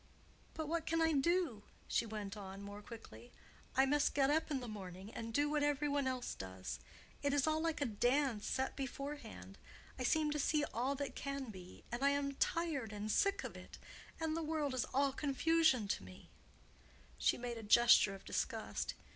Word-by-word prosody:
But 315 Hz, -1 st, -3 dB
what 330 Hz, +1 st, -1 dB
can 330 Hz, 0 st, +2 dB
I 325 Hz, -1 st, +3 dB
do?" 300 Hz, -, +2 dB, 0.3 s
she 230 Hz, -, +1 dB
went 210 Hz, -1 st, -5 dB
on, 195 Hz, -1 st, -7 dB
more 205 Hz, +1 st, -7 dB
quickly. 125 Hz, -, -11 dB, 0.5 s
"I 265 Hz, -, +7 dB
must 290 Hz, +2 st, +2 dB
get 275 Hz, 0 st, +4 dB
up 320 Hz, +2 st, +2 dB
in 280 Hz, -3 st, 0 dB
the 245 Hz, -, -6 dB
morning 195 Hz, -1 st, -7 dB
and 230 Hz, 0 st, -5 dB
do 290 Hz, +5 st, +2 dB
what 300 Hz, 0 st, +1 dB
every 290 Hz, 0 st, +2 dB
one 285 Hz, -2 st, +1 dB
else 255 Hz, -1 st, -2 dB
does. 95 Hz, 0 st, -6 dB, 0.4 s
It 285 Hz, 0 st, +1 dB
is 280 Hz, -, +3 dB
all 310 Hz, 0 st, +2 dB
like 325 Hz, -2 st, -1 dB
a -, -, +3 dB
dance 245 Hz, +1 st, +1 dB
set 265 Hz, 0 st, -1 dB
beforehand. 265 Hz, -, -6 dB, 0.4 s
I -, -, -1 dB
seem 305 Hz, +4 st, +2 dB
to 300 Hz, -, -1 dB
see 300 Hz, +1 st, +2 dB
all 255 Hz, +4 st, 0 dB
that 280 Hz, 0 st, -3 dB
can 275 Hz, -4 st, -4 dB
be—and 195 Hz, +6 st, -7 dB
I 280 Hz, -, +6 dB
am 280 Hz, 0 st, 0 dB
tired 285 Hz, -6 st, 0 dB
and 210 Hz, +1 st, -3 dB
sick 395 Hz, -, +2 dB
of -, -, -6 dB
it. -, -, -10 dB, 0.4 s
And 320 Hz, -1 st, 0 dB
the 330 Hz, -, -1 dB
world 305 Hz, -3 st, -1 dB
is 255 Hz, -1 st, 0 dB
all 275 Hz, +1 st, +1 dB
confusion 295 Hz, -4 st, +3 dB
to -, -, -1 dB
me"—she 65 Hz, -9 st, -5 dB
made 240 Hz, -1 st, -4 dB
a -, -, -6 dB
gesture 220 Hz, -2 st, +6 dB
of 195 Hz, -, -13 dB
disgust. -, -, -2 dB
270 Hz, 190 wpm, -37 LUFS, 215-295 Hz, 0.5 s, I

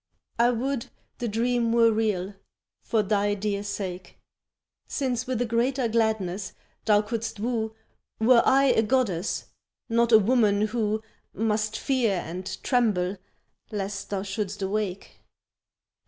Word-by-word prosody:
I 235 Hz, +1 st, +5 dB
would 250 Hz, +1 st, -1 dB, 0.3 s
the 240 Hz, -, -2 dB
dream 235 Hz, +1 st, +1 dB
were 230 Hz, -1 st, +5 dB
real 210 Hz, -3 st, 0 dB, 0.5 s
for 220 Hz, -2 st, +1 dB
thy 205 Hz, 0 st, +1 dB
dear 200 Hz, 0 st, -2 dB
sake. 185 Hz, -3 st, -5 dB, 0.7 s
Since 255 Hz, -3 st, -2 dB
with 255 Hz, -3 st, -1 dB
a -, -, -2 dB
greater 240 Hz, +2 st, +1 dB
gladness 215 Hz, -4 st, 0 dB, 0.3 s
thou 210 Hz, -1 st, +4 dB
couldst 225 Hz, -1 st, -4 dB
woo 220 Hz, -1 st, -2 dB, 0.4 s
Were 235 Hz, +1 st, +6 dB
I 270 Hz, +1 st, +4 dB
a -, -, +4 dB
goddess, 215 Hz, -6 st, 0 dB, 0.4 s
not 235 Hz, +1 st, +2 dB
a 220 Hz, -, +10 dB
woman 215 Hz, -2 st, +3 dB
who 215 Hz, 0 st, 0 dB, 0.3 s
Must 215 Hz, 0 st, 0 dB
fear 250 Hz, -6 st, +1 dB
and 180 Hz, +1 st, -5 dB, 0.2 s
tremble 205 Hz, -7 st, +1 dB, 0.5 s
lest 200 Hz, -1 st, -4 dB
thou 195 Hz, -1 st, -2 dB
shouldst 200 Hz, 0 st, -3 dB
awake. 195 Hz, -1 st, -3 dB
220 Hz, 125 wpm, -26 LUFS, 200-235 Hz, 0.7 s, a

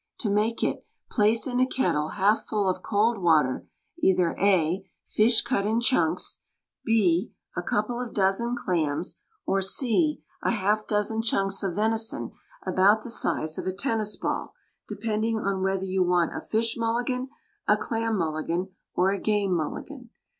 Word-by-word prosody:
To 210 Hz, -, 0 dB
make 215 Hz, +3 st, +1 dB
it: -, -, -1 dB, 0.3 s
Place 215 Hz, +2 st, +3 dB
in 250 Hz, -1 st, -1 dB
a 255 Hz, -, +4 dB
kettle 170 Hz, -, 0 dB
half 205 Hz, +3 st, +3 dB
full 205 Hz, -2 st, 0 dB
of 185 Hz, -, 0 dB
cold 220 Hz, +1 st, +1 dB
water 155 Hz, -7 st, +2 dB, 0.3 s
either 180 Hz, -, +2 dB
(a) 185 Hz, -2 st, +2 dB, 0.2 s
fish 220 Hz, +2 st, +3 dB
cut 240 Hz, -5 st, 0 dB
in 220 Hz, +2 st, +1 dB
chunks, 180 Hz, -9 st, +2 dB, 0.4 s
(b) 195 Hz, -6 st, +2 dB, 0.2 s
a -, -, -1 dB
couple 215 Hz, +7 st, -1 dB
of 245 Hz, -, -5 dB
dozen 205 Hz, +5 st, +1 dB
clams, 165 Hz, -6 st, -2 dB, 0.2 s
or 195 Hz, -, +1 dB
(c) 265 Hz, -, +1 dB, 0.2 s
a -, -, 0 dB
half 210 Hz, 0 st, 0 dB
dozen 210 Hz, +1 st, 0 dB
chunks 195 Hz, -3 st, 0 dB
of 190 Hz, -4 st, -2 dB
venison 220 Hz, +2 st, -1 dB, 0.3 s
about 205 Hz, +3 st, +4 dB
the 240 Hz, -, -4 dB
size 155 Hz, -7 st, 0 dB
of -, -, -5 dB
a 185 Hz, -, -1 dB
tennis 215 Hz, -1 st, -1 dB
ball, -, -, -3 dB, 0.3 s
depend 215 Hz, -1 st, -2 dB
ing 225 Hz, -1 st, 0 dB
on 195 Hz, -3 st, -1 dB
whether 190 Hz, 0 st, 0 dB
you 190 Hz, 0 st, 0 dB
want 175 Hz, -2 st, +2 dB
a -, -, -4 dB
Fish 225 Hz, +1 st, 0 dB
Mulligan, 240 Hz, +3 st, -1 dB, 0.4 s
a -, -, +5 dB
Clam 225 Hz, -1 st, -1 dB
Mulli 155 Hz, -4 st, -2 dB
gan, 180 Hz, +3 st, -1 dB, 0.3 s
or 185 Hz, +2 st, +3 dB
a 200 Hz, -, -2 dB
Game 205 Hz, -3 st, +1 dB
Mulligan. 240 Hz, -, -5 dB
210 Hz, 165 wpm, -26 LUFS, 185-225 Hz, 0.4 s, a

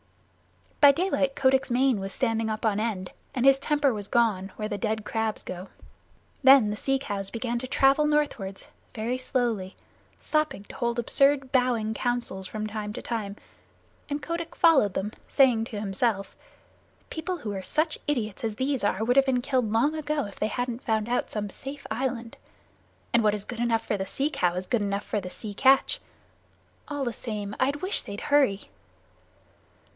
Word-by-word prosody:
By 285 Hz, -1 st, +9 dB
daylight 280 Hz, -4 st, 0 dB
Kotick's 265 Hz, 0 st, +3 dB
mane 250 Hz, -2 st, +3 dB
was 195 Hz, 0 st, -4 dB
standing 225 Hz, -2 st, 0 dB
on 215 Hz, -1 st, 0 dB
end 210 Hz, -5 st, -2 dB, 0.2 s
and 255 Hz, 0 st, +1 dB
his 270 Hz, 0 st, +6 dB
temper 290 Hz, -2 st, +2 dB
was 205 Hz, -2 st, -4 dB
gone 205 Hz, -5 st, +1 dB
where 215 Hz, -, -3 dB
the 205 Hz, -2 st, -4 dB
dead 220 Hz, -1 st, -1 dB
crabs 220 Hz, -1 st, -2 dB
go. 185 Hz, +1 st, -7 dB, 0.8 s
Then 265 Hz, -5 st, +7 dB
the -, -, -2 dB
Sea 270 Hz, +5 st, 0 dB
Cow 205 Hz, -8 st, -4 dB
began 235 Hz, 0 st, -2 dB
to 255 Hz, -, -5 dB
travel 275 Hz, +3 st, +4 dB
northward 285 Hz, -11 st, -1 dB, 0.3 s
very 235 Hz, +3 st, -2 dB
slowly, 235 Hz, -8 st, -1 dB, 0.4 s
stopping 305 Hz, -9 st, -1 dB
to -, -, -12 dB
hold 235 Hz, -1 st, -1 dB
absurd 275 Hz, +2 st, +2 dB
bowing 245 Hz, -4 st, +2 dB
councils 235 Hz, -6 st, -2 dB
from 215 Hz, +1 st, -4 dB
time 210 Hz, -1 st, -4 dB
to -, -, -6 dB
time, 210 Hz, -4 st, -3 dB, 0.7 s
and 290 Hz, 0 st, -3 dB
Kotick 335 Hz, 0 st, -4 dB
followed 275 Hz, -, +4 dB
them, 210 Hz, +2 st, -2 dB, 0.2 s
saying 250 Hz, -5 st, +4 dB
to 220 Hz, -3 st, -6 dB
himself, 200 Hz, 0 st, -1 dB, 0.8 s
"People 360 Hz, +3 st, -3 dB
who 230 Hz, -10 st, -5 dB
are 190 Hz, -, -4 dB
such 310 Hz, -, 0 dB
idiots 230 Hz, -9 st, -2 dB
as 220 Hz, -2 st, -2 dB
these 265 Hz, +1 st, -1 dB
are 205 Hz, +1 st, +1 dB
would 245 Hz, +3 st, +2 dB
have 275 Hz, 0 st, +5 dB
been 250 Hz, -2 st, +2 dB
killed 250 Hz, -5 st, 0 dB
long 235 Hz, +7 st, +3 dB
ago 300 Hz, -2 st, -1 dB
if 200 Hz, -, -10 dB
they 215 Hz, -, +1 dB
hadn't 245 Hz, +1 st, -3 dB
found 220 Hz, -2 st, 0 dB
out 245 Hz, +1 st, 0 dB
some 210 Hz, -1 st, -3 dB
safe 275 Hz, +8 st, -8 dB
island. 235 Hz, -1 st, -3 dB, 0.8 s
And 235 Hz, -1 st, +4 dB
what 210 Hz, -1 st, +3 dB
is 205 Hz, -, -6 dB
good 240 Hz, -2 st, -7 dB
enough 235 Hz, -1 st, +1 dB
for 210 Hz, -, 0 dB
the 190 Hz, 0 st, -3 dB
Sea 285 Hz, +8 st, -1 dB
Cow 180 Hz, -, +1 dB
is 185 Hz, +1 st, -3 dB
good 235 Hz, +3 st, 0 dB
enough 200 Hz, 0 st, -1 dB
for 210 Hz, -, -2 dB
the 180 Hz, -, -6 dB
Sea 205 Hz, +3 st, -7 dB
Catch. 270 Hz, -, +4 dB, 0.9 s
All 290 Hz, -1 st, -3 dB
the 240 Hz, -3 st, -2 dB
same, 210 Hz, -3 st, -5 dB
I 260 Hz, -, +3 dB
wish 295 Hz, +8 st, -1 dB
they'd 200 Hz, 0 st, -7 dB
hurry." 270 Hz, -9 st, +2 dB
235 Hz, 180 wpm, -27 LUFS, 210-270 Hz, 0.9 s, By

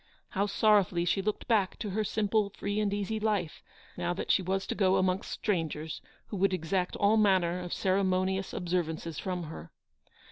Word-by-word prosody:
How 200 Hz, +1 st, 0 dB
sorrowfully 195 Hz, -4 st, +3 dB
she 195 Hz, +3 st, +1 dB
looked 210 Hz, +2 st, -3 dB
back 210 Hz, -5 st, +2 dB
to 210 Hz, -3 st, -4 dB
her 215 Hz, +3 st, 0 dB
simple, 210 Hz, 0 st, +1 dB
free 205 Hz, +1 st, -3 dB
and 210 Hz, -2 st, +1 dB
easy 205 Hz, +2 st, -2 dB
life, 205 Hz, -7 st, -1 dB, 0.3 s
now 175 Hz, 0 st, -1 dB
that -, -, -1 dB
she -, -, +4 dB
was 190 Hz, +1 st, -1 dB
to -, -, -2 dB
go 190 Hz, -2 st, +3 dB
amongst 185 Hz, 0 st, +1 dB
strangers 160 Hz, -5 st, -2 dB, 0.3 s
who 205 Hz, -, -4 dB
would 195 Hz, 0 st, +2 dB
exact 180 Hz, +2 st, -1 dB
all 205 Hz, +2 st, +3 dB
manner 190 Hz, -5 st, +4 dB
220 180 Hz, +1 st, -3 dB
of -, -, -10 dB
ceremonious 190 Hz, 0 st, +1 dB
observances 170 Hz, -3 st, -2 dB
from 180 Hz, -2 st, -3 dB
her. 150 Hz, -, -8 dB
190 Hz, 180 wpm, -30 LUFS, 175-205 Hz, 0.3 s, she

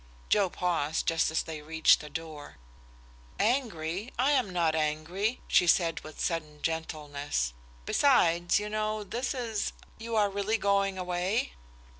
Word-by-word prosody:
Joe 200 Hz, -3 st, +3 dB
paused 165 Hz, -4 st, -1 dB
just 165 Hz, 0 st, +2 dB
as 160 Hz, -, 0 dB
they 155 Hz, -2 st, -7 dB
reached 160 Hz, +1 st, +4 dB
the 150 Hz, -, -9 dB
door. 155 Hz, -1 st, -8 dB, 0.8 s
"Angry? 210 Hz, -, -1 dB
I 260 Hz, +4 st, +3 dB
am 260 Hz, -8 st, +2 dB
not 170 Hz, -3 st, +1 dB
angry," 160 Hz, +9 st, -1 dB
she 175 Hz, -, +4 dB
said 165 Hz, -1 st, +3 dB
with 155 Hz, -, -12 dB
sudden 155 Hz, -3 st, -3 dB
gentleness. 145 Hz, -, -2 dB, 0.3 s
"Besides, 175 Hz, -, +3 dB
you 210 Hz, -, -4 dB
know, 215 Hz, 0 st, -2 dB
this 245 Hz, +7 st, -3 dB
is 225 Hz, -5 st, -2 dB, 0.3 s
you 230 Hz, 0 st, -4 dB
are 205 Hz, -2 st, +3 dB
really 200 Hz, +3 st, 0 dB
going 200 Hz, -2 st, +1 dB
away?" 180 Hz, +4 st, -1 dB
180 Hz, 140 wpm, -29 LUFS, 160-215 Hz, 0.8 s, reached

